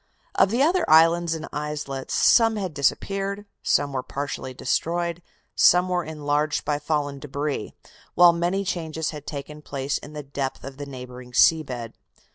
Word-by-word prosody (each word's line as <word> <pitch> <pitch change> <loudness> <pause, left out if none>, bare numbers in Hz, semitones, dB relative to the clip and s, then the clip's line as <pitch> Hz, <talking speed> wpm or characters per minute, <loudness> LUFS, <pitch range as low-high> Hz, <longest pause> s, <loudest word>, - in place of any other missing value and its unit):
Of 190 - +4
the 240 +6 +2
other 350 +3 +3
islands 165 +1 +5
and 160 - -6
islets 150 -3 -4
some 225 -2 +5
had 190 -6 -3
disappeared; 195 - -1 0.2
some 140 -1 +1
were 130 - -1
partially 135 -1 -5
destroyed; 170 +6 -1 0.3
some 180 +1 +5
were 180 -1 0
enlarged 150 -1 -1
by 145 -1 0
fallen 145 -3 -2
debris, 140 -3 -4 0.4
while 175 0 +7
many 175 +4 -1
changes 160 -3 -3
had 150 -2 -9
taken 150 +1 -7
place 140 -1 -3
in 150 - -11
the 150 -1 -6
depth 135 -1 -4
of 135 0 -8
the 145 0 -7
neighboring 125 -2 -9
sea 160 +4 +6
bed. 120 -6 -6
150 Hz, 160 wpm, -24 LUFS, 140-175 Hz, 0.4 s, while